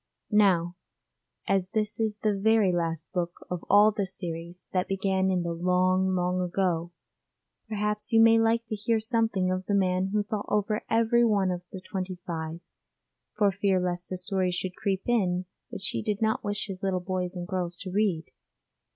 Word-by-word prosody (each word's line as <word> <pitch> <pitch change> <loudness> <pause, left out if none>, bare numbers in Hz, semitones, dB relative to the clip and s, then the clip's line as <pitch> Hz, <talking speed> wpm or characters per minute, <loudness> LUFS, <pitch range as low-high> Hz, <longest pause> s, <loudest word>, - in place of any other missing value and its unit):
Now 180 -4 +3 0.7
as 190 -1 +1
this 215 +1 -2
is 215 -2 0
the 215 -1 +3
very 210 -1 +3
last 165 -2 -2
book 175 -1 -3
of 180 -2 -3
all 205 +2 +7
this 200 -3 -3
series 170 0 -6
that 185 -1 +1
began 190 -1 +1
in 180 -2 +1
the 170 0 -2
long 185 +2 +2
long 180 0 0
ago, 175 -2 -1 0.8
perhaps 210 0 -1
you 225 - +5
may 225 0 +7
like 225 +1 +2
to 220 - -4
hear 220 +2 0
something 220 -5 +1
of 185 0 -3
the 205 - +1
man 185 -1 +2
who 210 +1 0
thought 210 -1 -4
over 210 +1 0
every 230 +1 +3
one 200 -5 +2
of 175 -1 -3
the 190 - -6
twenty 185 0 -4
five, 165 0 -4 0.8
for 205 -2 +4
fear 195 -1 +1
lest 180 0 -3
a 185 - -2
story 185 0 0
should 180 +1 -2
creep 195 -1 -1
in 185 -6 +1 0.2
which 190 - -4
he 115 - -2
did 205 - -2
not 220 0 0
wish 205 0 -1
his 195 -2 -7
little 190 -2 0
boys 180 0 -3
and 175 -1 -5
girls 175 -2 -3
to 185 0 -6
read. 190 -5 +1
190 Hz, 185 wpm, -27 LUFS, 180-210 Hz, 0.8 s, all